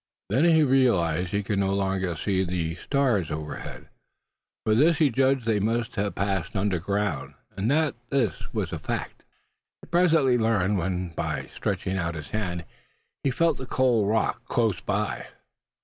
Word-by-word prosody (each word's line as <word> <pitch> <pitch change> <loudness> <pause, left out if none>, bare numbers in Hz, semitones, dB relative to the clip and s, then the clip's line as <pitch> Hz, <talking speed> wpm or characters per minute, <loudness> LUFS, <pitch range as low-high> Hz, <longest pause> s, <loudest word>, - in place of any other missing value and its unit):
Then 145 +6 +3
he 160 -2 +5
realized 100 - +3
that 100 - 0
he 100 - -1
could 100 0 -1
no 95 0 +1
longer 95 -3 -1
see 95 +2 0
the 85 -2 -2
stars 110 - 0
overhead. 75 0 -6 0.8
From 110 +1 +3
this 160 +2 +5
he 155 -5 +3
judged 135 0 +2
they 110 -2 +2
must 115 +2 -1
have 100 -1 -1
passed 100 +1 -1
underground; 95 -6 -1 0.2
and 100 +3 -1
that 155 0 +2 0.2
this 120 - -1
was - - -2
a - - -3
fact - - -4 0.6
he - - -12
presently 160 -8 +3
learned 105 -3 +2
when, 90 0 -2
by 80 - -4
stretching 95 0 -2
out 85 -1 -2
his 75 -2 -8
hand, 90 -5 -2 0.6
he 140 - +2
felt 160 +2 +1
the 130 - -6
cold 120 -6 +2
rock 110 +1 0
close 115 -5 0
by. - - -2
105 Hz, 165 wpm, -26 LUFS, 90-130 Hz, 0.8 s, he